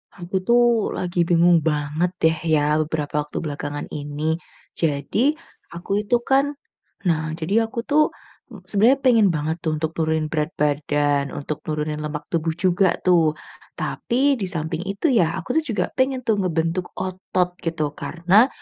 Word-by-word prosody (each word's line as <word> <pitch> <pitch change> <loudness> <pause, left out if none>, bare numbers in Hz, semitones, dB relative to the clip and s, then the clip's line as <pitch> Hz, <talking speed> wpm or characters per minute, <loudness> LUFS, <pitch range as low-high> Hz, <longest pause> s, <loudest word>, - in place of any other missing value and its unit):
Aku 180 +2 -3
tuh, 240 -2 +3
lagi 175 -1 0
bingung 175 0 +5
banget 150 +2 0
deh 160 0 +4 0.2
ya, 150 +1 +2
beberapa 150 -1 -2
waktu - - -7
belakangan 145 -1 -4
ini. 150 +3 -2 0.4
Jadi, 165 - +1 0.4
aku 180 +4 -2
itu 210 +3 +1
kan 275 +3 +2 0.5
nah, 160 -2 +1
jadi 210 +8 +1
aku 235 - -5
tuh, 305 +1 +4 0.5
m 205 -6 -12
sebenarnya 220 +8 +4
pengen 230 -5 +5
banget 155 +1 -1
tuh 160 -2 0
untuk 160 +1 -2
nurunin 160 -1 +1
berat 150 -1 0
badan, 145 -1 +1
untuk 145 +1 -4
nurunin 150 0 -2
lemak 150 0 -4
tubuh 165 -1 0
juga 185 +1 +2
tuh. 165 -4 +4 0.4
Tapi, 270 +4 +1
di 195 - -2
samping 160 -2 -3
itu 200 +11 -1
ya, 170 -8 +3
aku - - -7
tuh - - -4
juga 210 - +1
pengen 260 0 +1
tuh 225 -2 +3
ngebentuk 170 0 -1
otot 185 -1 -1
gitu. 160 -3 -1
Karena, 180 +8 +3
170 Hz, 155 wpm, -22 LUFS, 155-200 Hz, 0.5 s, bingung